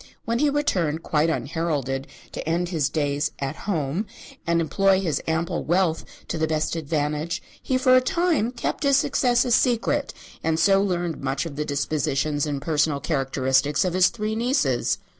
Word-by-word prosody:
When 230 +1 0
he 295 +1 +3
returned, 180 - 0
quite 155 0 +1
unheralded, 145 -5 -2 0.2
to - - -5
end 175 +2 0
his 155 -5 0
days 145 -1 -1
"at 135 +2 -3
home" 165 +3 -1 0.4
and 170 0 +2
employ 190 +4 +2
his 160 -7 -1
ample 160 +1 -1
wealth 175 -1 +1 0.3
to 165 - -2
the 160 - +1
best 155 +1 -1
advantage, 150 +1 -2 0.2
he 260 - 0
for 255 0 +5
a 255 - +6
time 335 - +1
kept 245 - -3
his 280 -2 +4
success 245 -3 +2
a 245 - -1
secret, 240 -1 +2 0.3
and 160 0 +1
so 195 +2 +4
learned 175 -4 -2
much 135 +3 -1
of 155 -4 -6
the 150 +1 -2
dispositions 145 0 -1
and 140 -2 -3
personal 150 -2 +1
characteristics 135 +1 +1
of 180 - -1
his 185 0 +5
three 215 -1 -3
nieces. 230 - +1
165 Hz, 170 wpm, -24 LUFS, 145-200 Hz, 0.4 s, a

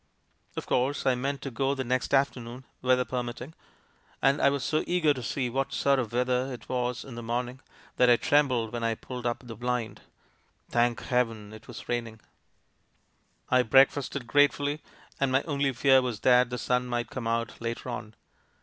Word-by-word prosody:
"Of - - -3
course, 130 +3 0
I 130 - +4
meant 135 +2 -3
to 135 - -4
go 135 +4 0
the 135 - -2
next 130 +1 -1
afternoon 130 -2 0
— - - -43
weather 125 0 +3
permitting 125 +3 -5 0.3
— - - -34
and 135 +2 +3
I - - +6
was 140 -1 -2
so 155 +3 0
eager 170 -4 +3
to 130 - -6
see 125 +3 -2
what 135 +3 -2
sort 140 +1 +2
of 120 -4 -3
weather 125 +2 0
it 125 - -9
was 125 -1 -2
in 135 - -9
the 120 - -6
morning 120 +2 -3 0.4
that 125 - +5
I 120 - +8
trembled 125 -5 +2
when 120 -1 -3
I 115 0 +1
pulled 125 +1 -8
u]) 120 - 0
the 120 -2 -8
blind. 120 -2 -3 0.7
Thank 120 0 +1
Heaven! 115 -4 -1
it 110 +1 -13
was 120 - -8
rairiing. 115 -2 -3 1.3
I 130 0 +6
breakfasted 135 +2 +3
grate 145 +4 +4
fully, 145 +1 -3 0.4
and 140 -1 +1
my 135 +2 +2
only 140 -3 0
fear 130 +1 +4
was 125 -5 -3
that 125 -1 +5
the 125 - -3
sun 125 0 0
might 120 -2 -2
come 125 -3 -4
out 115 0 -2
later 115 +2 -4
on. 120 -3 -6
125 Hz, 195 wpm, -28 LUFS, 120-135 Hz, 1.3 s, I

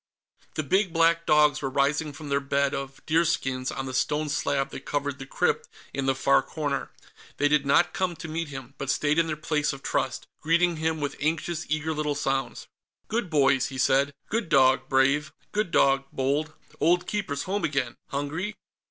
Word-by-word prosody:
The 155 - -1
big 190 +6 +2
black 165 0 +3
dogs 150 -2 +4
were 135 - -1
rising 145 +3 +1
from 145 +1 -9
their 140 0 +2
bed 140 0 0
of 135 0 -6
deerskins 150 -6 +1
on 135 - -4
the 130 - -5
stone 150 +4 0
slab 140 -1 0
that - - -6
covered 145 -1 -2
the 135 - -8
crypt - - 0 0.2
in 135 0 -2
the 135 - +3
far 140 +1 +4
corner. 145 -3 -3 0.5
They 145 - +3
did 145 -1 +2
not 175 +5 +4
come 185 -2 -1
to 160 - -8
meet 165 +1 -3
him, 135 -2 -8
but 140 - -4
stayed 150 +3 +2
in 165 - +2
their 155 -1 -2
place 150 -1 0
of 140 - -10
trust, 130 - -1 0.2
greeting 170 +1 +2
him 160 0 -1
with 145 -1 -2
anxious, 160 +2 -1
eager 155 +1 0
little 150 -1 -1
sounds. 135 -2 -2 0.4
"Good 225 -4 -1
boys," 140 -4 +3
he 135 - -7
said. 135 +2 +3 0.2
"Good 225 -5 -2
dog, 130 -1 +4
Brave; 140 +3 +3 0.2
good 210 -3 0
dog, 135 -3 +3
Bold. 145 +4 -1 0.2
Old 175 +3 +3
Keeper's 190 -9 -2
home 200 +2 -2
again. 135 -5 -1
Hungry?" 160 +9 -3
145 Hz, 185 wpm, -26 LUFS, 135-160 Hz, 0.5 s, dogs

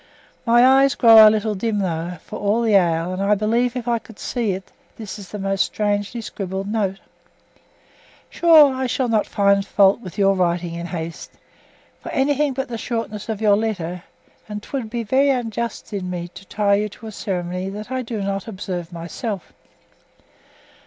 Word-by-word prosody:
My 240 +1 +6
eyes 270 +1 +5
grow 225 -2 +8
a - - +8
little 215 0 0
dim 210 +2 -2
though, 175 -3 -2
for - - -7
all 210 +3 +1
the 225 -2 +2
ale, 170 -2 +2
and 185 - -4
I 200 +1 +3
believe 235 +4 0
if 250 -1 -5
I 235 -1 +1
could 225 -1 -16
see 230 -6 -2
it 190 0 -8 0.2
this 210 -2 -8
is 195 - -11
most 195 -1 0
strangely 205 +2 -2
scribbled. 195 -2 -5 1.6
Sure, 315 -5 +6
I 260 0 -2
shall 250 +1 0
not 220 -2 +1
find 200 0 +2
fault 195 +1 +3
with 185 -7 -10
your 195 -1 +4
writing 175 -2 0
in 170 +1 -5
haste, 165 -2 -6 0.7
for - - -9
anything 285 +1 +1
but 265 +1 -3
the 230 -2 -5
shortness 225 -3 -4
of 220 -1 -3
your 210 -2 +5
letter; 185 -5 -3 0.5
and 210 0 -6
'twould 260 -6 -5
be 235 +1 -3
very 265 +6 +2
unjust 235 -4 -3
in 185 -3 -3
me 175 -1 -5
to 195 - -13
tie 205 +1 +1
you 210 +1 +1
to 225 - -14
a 220 - -6
ceremony 180 -2 -3
that 210 +5 -8
I 260 0 -1
do 225 -4 -4
not 195 0 -3
observe 185 -4 -5
myself. 175 +4 -6
210 Hz, 180 wpm, -21 LUFS, 190-235 Hz, 1.6 s, grow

